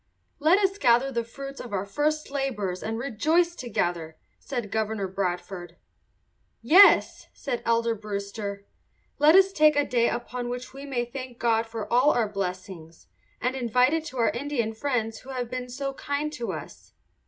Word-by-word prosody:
"Let 320 +6 +5
us 395 0 +1
gather 245 0 +4
the 235 -2 -1
fruits 275 +4 -9
of 240 - -9
our 195 0 -1
first 300 +8 -1
labours 230 -10 -2
and 225 +1 -3
rejoice 310 +8 +1
together," 175 - -2 0.2
said 240 -7 -5
Governor 220 -2 -1
Bradford. 180 -2 -4 0.8
"Yes," 350 - +6
said 240 - -4
Elder 230 0 +2
Brewster, 200 -1 -5 0.5
"let 300 +3 +6
us 385 0 +6
take 305 -2 +5
a 290 0 +2
day 235 -2 +2
upon 240 0 -4
which 250 +1 -6
we 275 +1 -9
may 245 -3 -1
thank 255 0 -8
God 230 -1 +1
for 225 -2 -5
all 255 +4 +5
our 230 -3 +1
blessings, 185 -4 -6 0.3
and 250 +2 -1
invite 250 +1 +2
to - - +2 0.2
it - - -3
our 230 - +4
Indian 235 -2 -2
friends 225 -3 -2
who 265 - -14
have 250 -2 -4
been 250 -1 -4
so 275 +2 -4
kind 285 +2 -3
to 240 -5 -4
us." - - -9
240 Hz, 165 wpm, -26 LUFS, 210-275 Hz, 0.8 s, Yes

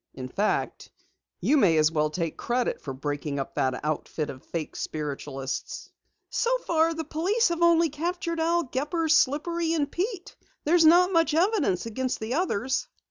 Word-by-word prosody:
"In 130 -1 -6
fact, 205 +10 -1 0.5
you 300 - +3
may 180 - +4
as 155 0 +4
well 155 -1 +1
take 165 0 -3
credit 245 +1 -1
for 140 - -5
breaking 145 +2 -4
up 135 - -4
that 130 -1 0
outfit 155 0 -2
of 130 - -13
fake 165 -3 -5
spiritualists." 135 -3 -5 0.4
"So - - +1
far 330 0 +2
the 320 - -3
police 360 +9 +1
have 340 0 -2
only 335 -1 +5
captured 335 +2 -3
Al 340 +1 +2
Gepper, 300 +5 -2
Slippery 325 +3 +2
and 295 -4 0
Pete. 380 0 -4 0.3
There's 330 +2 +4
not 355 +3 +6
much 330 -3 +2
evidence 330 - +1
against 255 +3 -2
the 220 +3 -3
others." 265 - 0
295 Hz, 160 wpm, -26 LUFS, -, 0.5 s, not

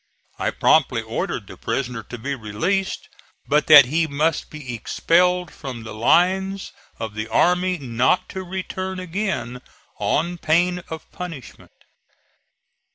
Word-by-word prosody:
I - - +1
promptly - - +3
ordered - - -3
the - - -12
prisoner 125 -3 -3
to 120 - -9
be 135 +5 -3
released, 140 - -2 0.4
but 150 +1 +2
that 150 -3 +10
he 160 +5 +1
must 150 +2 0
be 145 -5 -7
expelled 180 +8 +1
from 125 -4 -7
the 110 - -8
lines 190 - +2 0.3
of 110 -2 -5
the 110 +1 -4
army 180 +9 +2
not 130 +4 +1
to 190 - -5
return 185 0 -4
again 185 - -3 0.4
on 160 +12 0
pain 175 +3 +2
of 160 -1 -6
punishment. 165 -8 -9
160 Hz, 130 wpm, -22 LUFS, 125-180 Hz, 0.4 s, that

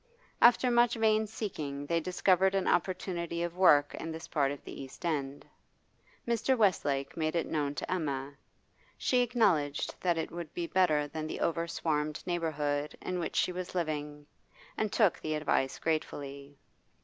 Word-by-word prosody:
After 245 +1 +6
much 240 0 +4
vain 220 -1 +2
seeking 150 -10 -5
they 170 +3 +1
discovered 185 +2 +2
an 195 - 0
opportunity 175 -2 -1
of 175 0 -4
work 145 -6 +5
in 165 - -5
this 160 0 -7
part 140 -3 +1
of 145 - -7
the - - -8
East 135 +6 -9
End. 140 -4 -2 0.8
Mr. 235 +3 +2
Westlake 145 -10 +1
made 155 0 -1
it 170 - +1
known 145 -2 -1
to - - -4
Emma; 140 -6 -2 0.6
she 250 - +2
acknowledged 195 - +1
that 175 -2 +1
it 160 - -3
would 170 -2 -6
be 175 - -2
better 155 -5 +2
than 155 +1 -5
the - - -5
over 170 0 0
swarmed 155 -2 -2
neighbourhood 150 -4 -1
in 180 -1 -3
which 165 - -3
she - - +2
was 180 0 -6
living, 150 -3 -3 0.5
and 215 -2 -1
took 210 -6 +3
the 155 0 -2
advice 145 -3 0
gratefully. 140 -3 -3
165 Hz, 160 wpm, -31 LUFS, 145-185 Hz, 0.8 s, After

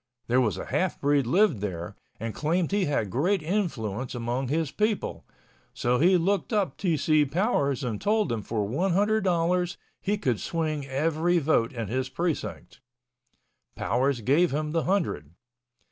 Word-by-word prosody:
There 125 +2 +3
was 105 -7 0
a - - -5
half 185 -2 -1
breed 140 -3 +2
lived 190 - +3
there 90 -4 -4 0.2
and 115 0 -4
claimed 165 +3 0
he 200 -2 +2
had 110 -9 -1
great 175 - +1
influence 130 - -2
among 120 +2 -2
his 155 +2 -1
people. 215 0 -1 0.5
So 125 +1 +1
he 180 +4 +5
looked 195 +6 0
up 200 -10 0
T. 175 -5 0
C. 155 +1 +3
Powers 140 - 0
and 115 -4 -3
told 215 0 +1
him 115 -2 -1
for 105 0 -2
one 170 - 0
hundred 210 +3 +2
dollars 180 0 +1 0.2
he 205 +2 0
could 125 - 0
swing 155 -4 -2
every 160 +5 +1
vote 145 -7 +2
in 115 -4 -4
his 130 +4 -2
precinct. 165 -1 -4 0.9
Powers 130 0 0
gave 150 +10 +3
him 150 +2 -2
the 165 0 0
hundred. 155 - -1
150 Hz, 160 wpm, -27 LUFS, 125-180 Hz, 0.9 s, he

